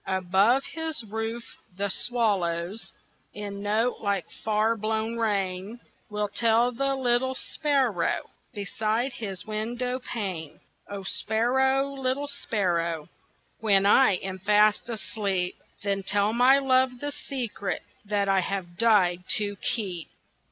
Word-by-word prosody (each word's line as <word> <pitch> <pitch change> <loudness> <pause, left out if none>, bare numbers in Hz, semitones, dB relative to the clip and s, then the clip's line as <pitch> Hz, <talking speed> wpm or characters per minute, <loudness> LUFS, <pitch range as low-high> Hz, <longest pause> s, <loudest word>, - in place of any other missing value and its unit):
Above 190 +7 +3
his 320 -5 -2
roof 225 +2 -5 0.2
the 200 +1 0
swallows, 195 -4 -1 0.4
In 200 -1 -5
notes 220 +4 0
like 200 -5 0 0.2
far 215 +1 +2
blown 220 +1 -1
rain, 200 0 -1 0.3
Will 210 0 -1
tell 230 +3 +3
the 275 +3 0
little 260 0 +1
sparrow 265 - 0 0.2
Beside 220 +5 -1
his 195 -5 -5
window 240 +4 -2
pane. 190 - -5 0.3
O 200 -1 -5
sparrow, 265 +7 +2
little 270 +1 -1
sparrow, 170 - -1 0.5
When 200 -3 +4
I 230 +2 +6
am 190 +1 -4
fast 210 +3 +3
asleep, 200 -5 -2 0.3
Then 200 -1 0
tell 205 +2 +1
my 250 +3 +6
love 260 -2 +2
the 290 +2 -3
secret 240 -9 -4 0.2
That 205 -1 0
I 195 -1 +4
have 180 -2 -4
died 190 -6 +4
to 205 -1 -2
keep. 185 -6 -3
215 Hz, 120 wpm, -27 LUFS, 195-245 Hz, 0.5 s, I